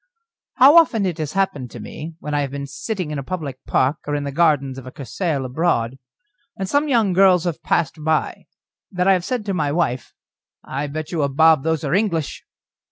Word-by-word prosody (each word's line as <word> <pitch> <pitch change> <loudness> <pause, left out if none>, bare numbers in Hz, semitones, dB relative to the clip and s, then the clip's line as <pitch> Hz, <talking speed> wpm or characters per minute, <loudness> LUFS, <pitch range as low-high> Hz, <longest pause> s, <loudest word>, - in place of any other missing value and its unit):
How 280 +6 +7
often 230 -11 +4
it 175 -3 -3
has 155 -1 -3
happened 150 -10 -1
to - - -10
me, 160 +2 -8
when 150 - -5
I 145 - +1
have 140 - -2
been 140 +1 -5
sitting 180 +3 -4
in 150 - -3
a - - -5
public 140 -5 -6
park 135 +4 +2
or 145 - -1
in 145 - -2
the 140 - -4
gardens 140 -4 +1
of 130 - -11
a - - -8
Cursaal 140 - -3
abroad, 130 -3 -1 0.6
and 190 - -3
some 285 +8 +1
young 225 -8 +2
girls 185 -2 +5
have 175 -3 -3
passed 160 -2 -1
by, 160 0 -1 0.4
that 180 -1 0
I 195 - +6
have 180 -2 0
said 245 +1 -3
to 200 - -2
my 155 -5 0
wife: 135 -7 -2 0.5
"I 140 +2 -4
bet 155 +2 -6
you 165 -3 -1
a 140 - +1
bob 160 +1 +4
those 160 -1 -1
are 145 0 -1
English." 175 -7 -1
155 Hz, 215 wpm, -21 LUFS, 140-185 Hz, 0.6 s, How